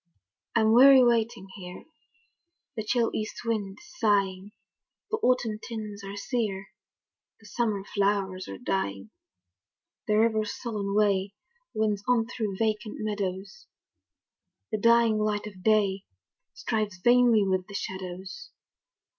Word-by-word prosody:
I'm 220 -1 +4
weary 265 +2 +8
waiting 230 -3 +1
here, 180 -2 -9 0.9
The 220 - -3
chill 230 +1 +1
east 215 +2 -5
wind 205 -4 -2
is 350 0 -17
sighing, 200 -3 +1 0.6
The 440 - +1
autumn 245 - +1
tints 215 -3 -7
are 195 0 -7
sere, 205 -4 -3 0.7
The 220 - -20
summer 210 -2 -1
flowers 195 -2 -1
are - - -7
dying. 100 - -3 1.0
The 210 -1 +2
river's 220 -1 +1
sullen 205 -4 -3
way 200 -1 +1 0.4
Winds 210 -2 0
on 245 -2 +3
through 215 -5 -4
vacant 215 0 -1
meadows, 205 - -4 1.0
The 215 - -1
dying 230 -1 +4
light 210 -1 -1
of 195 -3 -10
day 200 -2 +2 0.5
Strives 215 -4 -2
vainly 240 +1 +4
with 185 -1 0
the 200 - -9
shadows. 190 - -6
210 Hz, 120 wpm, -27 LUFS, 195-230 Hz, 1.0 s, weary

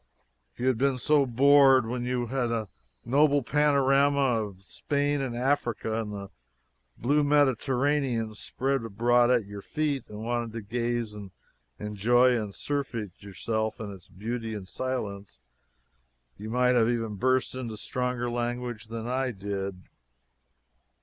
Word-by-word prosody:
If - - -32
you 125 - -2
had 130 -3 +2
been 135 -1 +2 0.4
bored 135 -1 +6
so, - - -7
when 120 +1 -3
you 125 -1 -1
had 125 +1 -1
the 115 -3 -2 0.4
noble 140 +3 +3
panorama 140 -3 +3
of 95 -1 -14
Spain 145 +6 -1
and 130 -3 -3
Africa 120 -4 0
and 105 -2 -5
the 100 -1 -7 0.7
blue 145 +5 +2
Mediterranean 135 -4 +1
spread 135 +4 -2
abroad 120 +3 +3
at 120 -4 +3
your 100 0 -8
feet, 145 +3 -2
and 105 +1 -8
wanted 120 -1 -2
to 115 - -4
gaze 120 0 -2
and 105 -2 -8 0.5
enjoy 120 +5 +3
and 105 -4 -3
surfeit 125 -8 -3
yourself 110 +3 -3
in 105 -2 -5
its 95 -3 -13
beauty 115 +3 -5
in 100 -3 -6
silence, 105 -4 -4 1.0
you 105 +2 -8
might 125 +2 +3
have 115 -2 +3
even 115 -3 -1
burst 130 +5 +1
into 120 -4 -5
stronger 125 +1 -2
language 120 -1 -3
than 115 0 -6
I 130 +1 0
did. 100 -3 -5
120 Hz, 145 wpm, -28 LUFS, 110-130 Hz, 1.0 s, bored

